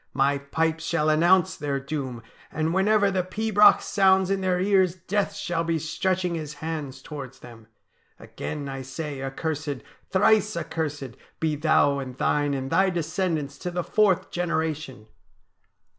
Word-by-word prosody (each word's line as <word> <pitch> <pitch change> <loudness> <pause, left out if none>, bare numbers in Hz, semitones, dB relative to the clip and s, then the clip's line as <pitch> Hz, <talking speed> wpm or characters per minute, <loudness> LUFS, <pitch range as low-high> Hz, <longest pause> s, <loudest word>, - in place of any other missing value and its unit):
My 140 +1 +2
pipes 160 +3 -1
shall 165 -2 +1
announce 170 +3 +4
their 140 -2 -2
doom, 135 -4 -5 0.3
and 160 +1 -1
whenever 200 +1 +3
the 190 -1 +1
pibroch 210 +3 +4
sounds 190 -1 +3
in 195 -1 0
their 185 -1 +1
ears 190 -2 +3
Death 190 +3 -2
shall 170 -1 -2
be 165 0 0
stretching 180 +3 -1
his 155 -3 -5
hands 150 -3 -5
towards 135 -4 -8
them. 115 -2 -13 0.5
Again 145 -2 -6
I 135 -1 -5
say 135 +1 -6
accursed, 145 +1 -4 0.3
thrice 210 +1 +3
accursed, 145 -6 -4 0.2
be 160 -2 0
thou 145 -2 +3
and 130 -2 -7
thine 145 0 +1
and 135 0 -4
thy 190 0 +4
descendants 165 -4 -2
to 180 - -4
the 175 0 -2
fourth 205 -2 +2
generation." 160 -8 -2
160 Hz, 145 wpm, -25 LUFS, 140-185 Hz, 0.5 s, announce